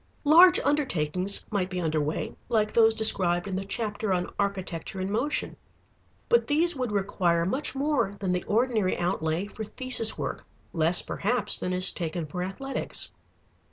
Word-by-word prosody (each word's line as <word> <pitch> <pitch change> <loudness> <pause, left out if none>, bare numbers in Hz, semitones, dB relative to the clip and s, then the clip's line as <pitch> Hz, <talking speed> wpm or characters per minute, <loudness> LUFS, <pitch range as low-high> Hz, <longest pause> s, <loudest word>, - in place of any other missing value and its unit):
Large 345 +5 +7
undertakings 195 - 0
might 190 -3 -1
be 185 -1 -4
under 160 -3 0
way, 150 +2 -3
like 215 -3 +1
those 225 -1 +4
described 185 -5 +3
in 190 - -3
the 190 - -3
chapter 205 0 -3
on 180 -1 -1
Architecture 190 -3 -3
in 190 +1 -3
Motion. 250 +8 -1 0.7
But 475 0 +3
these 325 +3 +2
would 250 -4 -3
require 180 -4 0
much 265 +8 -2
more 270 -8 0
than 190 -2 -2
the 180 -1 -1
ordinary 220 -3 +1
outlay 175 0 -1
for 215 +1 -8
thesis 235 0 +1
work, - - -4 0.3
less, 165 +1 +4
perhaps, 240 +5 -1
than 180 - -3
is 185 0 +2
taken 170 -1 -4
for 165 +4 -6
Athletics. 230 +10 -3
200 Hz, 155 wpm, -26 LUFS, 180-240 Hz, 0.7 s, Large